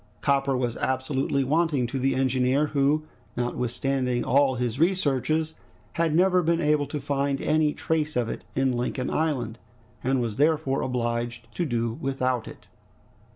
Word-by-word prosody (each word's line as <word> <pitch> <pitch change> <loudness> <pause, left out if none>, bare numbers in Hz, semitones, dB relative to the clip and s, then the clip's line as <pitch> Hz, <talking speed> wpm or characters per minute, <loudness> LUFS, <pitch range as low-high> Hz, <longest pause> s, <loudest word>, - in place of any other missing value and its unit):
Copper 135 -1 +2
was 120 -2 -1
absolutely 130 +1 0
wanting 150 -2 +1
to 125 +3 -3
the 135 +1 +1
engineer, 130 +2 +2
who, 145 +2 +2 0.3
notwithstanding 125 +1 -1
all 135 +1 +3
his 125 0 -2
researches, 160 -2 +1 0.4
had 165 -2 +1
never 180 +1 +4
been 170 0 +1
able 150 -3 +2
to 150 +2 -4
find 140 0 -1
any 155 0 +2
trace 155 0 -1
of 120 -2 +1
it - - -5
in 135 0 +2
Lincoln 125 +1 -2
Island, 130 -8 -1 0.4
and 130 +1 +1
was 115 -3 -2
therefore 145 -2 +2
obliged 120 -1 -3
to 175 - -1
do 115 -3 -1
without 130 -3 -1
it. - - -11
135 Hz, 150 wpm, -26 LUFS, 125-150 Hz, 0.4 s, never